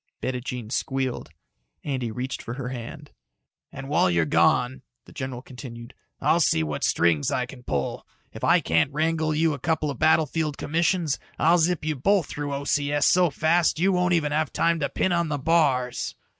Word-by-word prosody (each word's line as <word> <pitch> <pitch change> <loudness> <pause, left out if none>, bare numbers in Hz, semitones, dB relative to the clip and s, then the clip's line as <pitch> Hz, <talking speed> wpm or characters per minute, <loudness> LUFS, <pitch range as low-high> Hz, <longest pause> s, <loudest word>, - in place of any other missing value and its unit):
Bettijean 125 -3 -4
squealed. 130 -1 -2 0.5
Andy 130 -5 -2
reached 125 +3 -4
for 120 - -6
her 130 -2 -5
hand. 120 -3 -8 0.6
"And 135 -1 -8
while 140 -9 +2
you're 85 -2 +2
gone," 65 -3 +2 0.2
the - - -16
general 130 -1 -6
continued, 120 -3 -10 0.3
"I'll - - +2
see 80 - +2
what 75 -2 -4
strings 80 -4 +2
I 125 - 0
can 125 0 -12
pull. 70 - -3 0.3
If - - -10
I - - +4
can't 80 - +1
wangle 155 +1 0
you 160 0 +2
a 140 - -6
couple 155 +1 0
of 135 - -9
battlefield 155 -1 +2
commissions, 165 0 0 0.2
I'll 170 +3 +4
zip 170 -1 +1
you 155 -1 -1
both 190 +6 +2
through 145 0 -5
O.C.S. 145 +1 0
so 180 -1 +4
fast 160 +5 +2
you 185 +4 +2
won't 180 -1 +2
even 150 -3 0
have 155 +1 0
time 170 0 +1
to 140 - -1
pin 185 - 0
on 170 -2 +1
the 145 - -1
bars." 140 -5 +1
145 Hz, 180 wpm, -25 LUFS, 125-160 Hz, 0.6 s, I